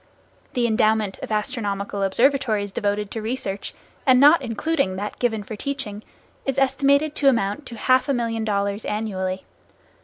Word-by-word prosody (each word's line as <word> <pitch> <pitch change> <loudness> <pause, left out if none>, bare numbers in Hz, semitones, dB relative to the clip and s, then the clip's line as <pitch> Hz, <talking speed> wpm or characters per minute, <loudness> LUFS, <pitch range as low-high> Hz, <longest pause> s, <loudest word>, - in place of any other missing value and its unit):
The 245 -1 +1
endowment 215 -2 +1
of - - -7
astronomical 205 -2 -2
observatories 215 -1 +2
devoted 205 0 -1
to 225 - -4
research, 215 -4 -4 0.3
and 255 -2 +5
not 295 +4 +7
including 245 -2 -1
that 205 +2 -5
given 225 -4 0
for 215 - -7
teaching, 215 -4 -4 0.4
is 270 -1 -2
estimated 280 +2 +3
to 275 - +5
amount 230 +2 -1
to 235 - -8
half 255 +5 +3
a - - +3
million 230 -2 -1
dollars 200 0 -1
annually. 190 -3 -3
220 Hz, 150 wpm, -23 LUFS, 205-260 Hz, 0.4 s, not